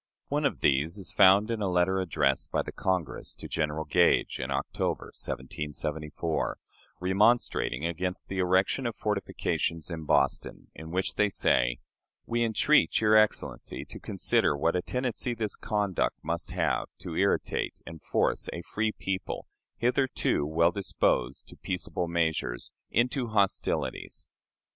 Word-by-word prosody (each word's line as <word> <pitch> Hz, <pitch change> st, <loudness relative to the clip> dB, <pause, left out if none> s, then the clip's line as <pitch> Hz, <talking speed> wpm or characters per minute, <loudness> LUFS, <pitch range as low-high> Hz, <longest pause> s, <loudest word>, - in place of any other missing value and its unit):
One 145 Hz, +1 st, 0 dB
of -, -, -6 dB
these 75 Hz, +6 st, +2 dB
is 95 Hz, -6 st, -4 dB
found 100 Hz, +3 st, +6 dB
in 115 Hz, -2 st, -2 dB
a 100 Hz, -, +1 dB
letter 90 Hz, +1 st, +2 dB
addressed 75 Hz, -7 st, +1 dB
by -, -, +1 dB
the -, -, -6 dB
Congress 90 Hz, -8 st, -2 dB
to -, -, -8 dB
General 75 Hz, 0 st, -1 dB
Gage 85 Hz, +4 st, +3 dB
in -, -, -3 dB
October, -, -, -2 dB
1774, 75 Hz, +3 st, -3 dB, 0.4 s
remonstrating 95 Hz, -, +2 dB
against 90 Hz, +2 st, -2 dB
the 95 Hz, -, -3 dB
erection 95 Hz, +8 st, +2 dB
of 115 Hz, -, -4 dB
fortifications 95 Hz, -5 st, -2 dB
in 80 Hz, -2 st, -5 dB
Boston, -, -, 0 dB
in 80 Hz, 0 st, -9 dB
which 95 Hz, +3 st, -1 dB
they 105 Hz, 0 st, +2 dB
say, -, -, +2 dB, 0.5 s
"We 120 Hz, 0 st, 0 dB
entreat 120 Hz, +6 st, +3 dB
your 110 Hz, 0 st, +4 dB
Excellency 110 Hz, -1 st, +1 dB
to -, -, -9 dB
consider 75 Hz, -, +1 dB
what 85 Hz, +4 st, +1 dB
a 90 Hz, -, +1 dB
tendency 125 Hz, +1 st, -2 dB
this 110 Hz, -3 st, -2 dB
conduct 105 Hz, -4 st, -1 dB
must 85 Hz, +2 st, -3 dB
have -, -, 0 dB
to -, -, -6 dB
irritate -, -, 0 dB
and 80 Hz, -1 st, -9 dB
force -, -, 0 dB
a 85 Hz, -, -6 dB
free 110 Hz, +3 st, -1 dB
people, 95 Hz, -1 st, -4 dB, 0.3 s
hitherto 125 Hz, -, +1 dB
well 85 Hz, +2 st, +3 dB
disposed 70 Hz, -9 st, 0 dB
to -, -, -11 dB
peaceable 90 Hz, -1 st, -3 dB
measures, 80 Hz, -7 st, -1 dB, 0.2 s
into 125 Hz, +2 st, +1 dB
hostilities." 100 Hz, -3 st, -1 dB
90 Hz, 140 wpm, -28 LUFS, 80-105 Hz, 0.5 s, found